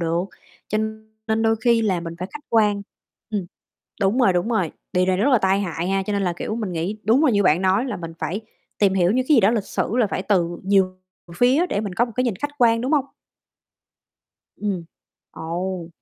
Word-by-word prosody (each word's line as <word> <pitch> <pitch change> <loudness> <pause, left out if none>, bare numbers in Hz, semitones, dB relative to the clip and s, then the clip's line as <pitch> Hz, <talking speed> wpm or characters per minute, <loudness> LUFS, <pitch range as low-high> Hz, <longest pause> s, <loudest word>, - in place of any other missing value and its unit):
được. 170 +2 0 0.4
Cho 215 - 0 0.5
nên 220 +1 +1
đôi 225 0 +3
khi 230 0 +2
là 190 -5 +1
mình 170 0 -6
phải 185 +2 -5
khách 295 0 -9
quan. 210 -3 +3 0.5
Ừm. 200 -5 -2 0.5
Đúng 200 +5 +2
rồi, 245 -8 +4
đúng 180 +5 0
rồi. 190 -9 0 0.2
Điều 180 0 +2
này 185 -1 +2
rất 230 +9 +2
là 250 - +6
tai 195 0 +2
hại 175 -1 -3
ha, 195 0 +1
cho 210 - -3
nên 200 -1 0
là, 180 -2 0
kiểu, 215 - -3
mình 210 -5 -3
nghĩ 175 +6 -2
đúng 245 +8 +4
là 270 - +5
như 205 -1 +3
bạn 180 0 +3
nói 190 +6 +2
là 235 -7 -3
mình 165 -2 -7
phải 190 +7 -3 0.4
tìm 195 -2 +3
hiểu 180 -1 +3
như 255 +3 +2
cái 300 - +6
gì - - +6
đó 200 +1 +4
lịch 225 -4 0
sử 225 - -2
là 240 -4 +3
phải 195 - -3
từ 175 -4 0
nhiều 190 -1 +2 0.4
phía 265 - +4
để 205 - -1
mình 200 -4 -5
có 235 - +3
một 235 - -9
cái 255 - +2
nhìn 230 -6 -1
khách 290 +9 -3
quan, 230 -1 +4
đúng 260 +5 -1
hông? 280 -3 +2 1.5
Ừm. 195 -5 -3 0.5
Ồ! 175 +1 -4
200 Hz, 230 wpm, -22 LUFS, 185-230 Hz, 1.5 s, là